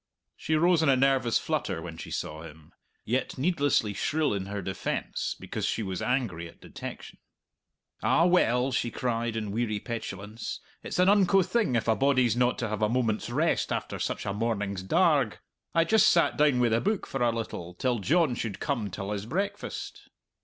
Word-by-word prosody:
She 155 - -1
rose 170 +1 +4
in 160 - +3
a 135 - +6
nervous 130 -3 +3
flutter - - -2
when - - -7
she - - -8
saw 80 +1 -4
him; 80 -1 -13 0.3
yet 125 +4 -1
needlessly 140 - +1
shrill 155 +5 0
in 95 -1 -3
her 100 +1 -4
defence, 95 0 -3
because - - -3
she 115 - -1
was 95 -3 -4
angry 115 -10 -1
at - - -16
detection. - - -9 0.8
"Ah, 165 - +3
well!" 135 -8 +3
she 120 -1 0
cried, 115 -1 -2
in 105 -2 -3
weary 110 -1 -1
petulance, 110 -2 -6 0.2
"it's - - -5
an 180 +1 +4
unco 195 -1 +5
thing 215 - 0
if 115 - 0
a 110 - +4
body's 130 -4 +3
not 125 0 +2
to 120 -3 -2
have 110 0 -3
a 105 - +3
moment's 115 -3 0
rest - - +1
after - - -3
such - - -3
a 100 - -1
morning's 105 -3 -2
darg! 95 - +2 0.4
I 165 - +5
just 215 +4 +4
sat 170 - +4
down 145 -4 +3
wi' 120 -1 +3
the 115 +1 +2
book 210 0 0
for 135 - -4
a 120 - +4
little, 90 -6 -5
till 125 +4 0
John 155 - +2
should 115 -4 -4
come 120 -8 -2
till 100 +2 -5
his 105 0 -4
breakfast!" 200 - -4
120 Hz, 190 wpm, -28 LUFS, 105-145 Hz, 0.8 s, a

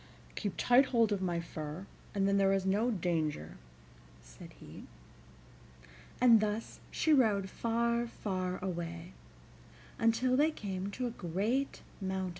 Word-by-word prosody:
"Keep 205 -4 -3
tight 250 +3 +5
hold 230 -4 +2
of 200 -2 0
my 175 -2 0
fur, 160 +1 -6 0.3
and 195 -1 +2
then 200 0 +3
there 195 -1 +4
is 195 -1 0
no 205 +5 +2
danger," 160 - -2 0.6
said - - -13
he. - - -12 1.3
And 235 -3 +7
thus 215 +1 -3
she 315 - +2
rode 210 -8 +3
far, 235 +1 0
far 185 -5 -3
away, 170 - -5 0.9
until 230 +3 +3
they 295 +4 +4
came 195 -9 -4
to 250 +5 -4
a 240 - -2
great 215 +8 -2 0.2
mountain. 190 -1 -2
200 Hz, 135 wpm, -32 LUFS, 185-235 Hz, 1.3 s, And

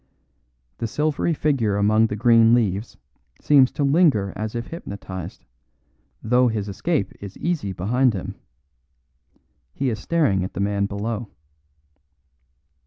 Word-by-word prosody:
The 115 - -2
silvery 155 +6 0
figure 130 -9 0
among 110 +2 +3
the 105 - -4
green 115 +1 +5
leaves 105 -2 -1 0.4
seems 135 -3 +5
to 145 - -1
linger 140 - +3
as 110 +1 -4
if 115 0 -3
hypnotised, 95 - -8 0.8
though 125 +3 +3
his 110 -3 -2
escape 100 - -2
is 100 -1 -9
easy 160 - -2
behind 115 +6 +1
him; 95 - -5 1.4
he 135 -2 0
is 110 - -4
staring 110 - +1
at 95 - -5
the - - -4
man 100 0 0
below. 110 +2 -4
110 Hz, 125 wpm, -22 LUFS, 100-135 Hz, 1.4 s, green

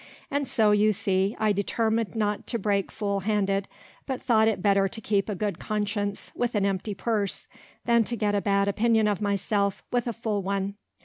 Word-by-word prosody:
And 285 -1 0
so, 220 -4 +3
you 210 +1 +4
see, 195 0 0
I 215 -1 +3
determined 220 +2 0
not 210 -2 -1
to 235 - -1
break 200 -2 0
full 200 -2 -1
handed, 195 -1 0 0.4
but 265 -2 -2
thought 220 -3 +3
it 220 - +1
better 195 -1 +4
to 220 - -6
keep 205 -1 0
a 210 - -1
good 205 +1 -2
conscience 205 -1 -2
with 240 -1 -1
an 200 -1 +2
empty 200 +1 -1
purse, 210 -2 -1 0.4
than 235 -1 +4
to 240 - -3
get 210 -2 0
a 205 - +1
bad 200 0 +2
opinion 220 +1 +3
of 205 -2 0
myself, 200 0 0
with 245 -1 0
a 235 - -1
full 220 -2 -2
one. 195 +1 -2
205 Hz, 195 wpm, -26 LUFS, 200-220 Hz, 0.4 s, you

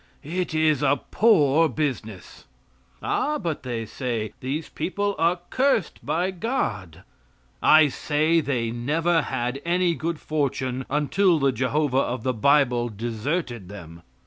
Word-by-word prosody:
It 170 +2 -3
is 155 -3 +2
a 145 -1 +2
poor 165 -8 +4
business. 120 - -4 0.6
"Ah?" 300 +1 0
but 170 - -3
they 120 -3 -4
say, 115 -4 -4
"these 145 +5 -3
people 200 +5 -2
are 170 +2 +2
cursed 255 - +1
by 180 +3 0
God." 100 - -3 0.6
I 155 -1 +6
say 155 +4 +1
they 120 -6 -1
never 160 +8 +1
had 130 0 -3
any 175 0 +1
good 165 0 -3
fortune 130 -4 -2
until 160 +5 +2
the 140 -2 +2
Jehovah 130 +3 0
of 125 -3 -2
the 130 - 0
bible 125 0 +2
deserted 115 - -3
them. 85 -5 -10
145 Hz, 130 wpm, -24 LUFS, 120-165 Hz, 0.6 s, I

